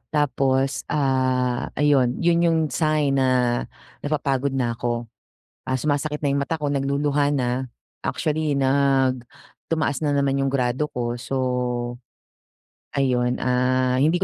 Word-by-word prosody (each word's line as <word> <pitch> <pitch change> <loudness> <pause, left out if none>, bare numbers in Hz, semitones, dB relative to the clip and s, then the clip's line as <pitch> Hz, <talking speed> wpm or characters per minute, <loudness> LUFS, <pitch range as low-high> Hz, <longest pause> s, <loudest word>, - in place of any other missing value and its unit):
Tapos, 135 -1 +1
ah, 130 -3 +1
ayun 135 -4 +3
'yon 170 0 +3
'yong 165 -1 +2
sign 150 -4 +1
na 130 - +3 0.7
napapagod 140 -2 -1
na 120 -3 0
ako, 120 0 -3 0.5
ah, 130 - -2
sumasakit 150 0 -1
na 145 - +1
'yong 140 0 +1
mata 160 0 -3
ko, 145 - 0
nagluluha 140 +1 +1
na. 125 -1 -1 0.4
Actually, 155 -1 -1
nag 135 -2 +2 0.4
tumaas 160 -4 0
na 145 - +1
naman 140 -1 +1
'yong 135 0 0
grado 125 +2 +1
ko, 120 -1 -2
so, 130 +3 -5 1.6
ayun, 125 -3 +1
ah, 130 0 +2
hindi 165 +6 +2
135 Hz, 125 wpm, -23 LUFS, 130-145 Hz, 1.6 s, ayun